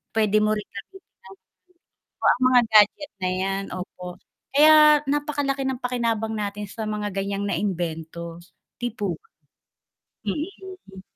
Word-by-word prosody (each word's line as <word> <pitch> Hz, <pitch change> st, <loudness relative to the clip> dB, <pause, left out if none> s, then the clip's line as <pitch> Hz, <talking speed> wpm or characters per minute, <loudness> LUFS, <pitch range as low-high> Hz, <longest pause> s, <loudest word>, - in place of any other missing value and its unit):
pwede 215 Hz, -1 st, +3 dB
mo 215 Hz, -, +2 dB
rin 210 Hz, -, -7 dB
gamitin 385 Hz, -, -11 dB, 1.1 s
ng -, -, -64 dB
o, -, -, +4 dB
ang -, -, +1 dB
mga 250 Hz, -1 st, +6 dB
gadget 215 Hz, +8 st, +4 dB
na 185 Hz, -, 0 dB
'yan. 195 Hz, +1 st, -2 dB
Opo. 180 Hz, 0 st, -8 dB, 0.5 s
Kaya 305 Hz, +1 st, +7 dB
napaka-laki 285 Hz, -1 st, -1 dB
ng 265 Hz, -1 st, -2 dB
pakinabang 230 Hz, -3 st, -1 dB
natin 205 Hz, -1 st, -4 dB
sa 220 Hz, +3 st, -7 dB
mga 210 Hz, -1 st, -2 dB
gan'yang 200 Hz, +1 st, -2 dB
na-imbento, 170 Hz, -4 st, -3 dB, 0.4 s
'di 240 Hz, -, 0 dB
po 200 Hz, -6 st, -2 dB
ba? 450 Hz, -, -32 dB, 1.0 s
Mm. 315 Hz, -, -6 dB
215 Hz, 135 wpm, -24 LUFS, 195-275 Hz, 1.1 s, Kaya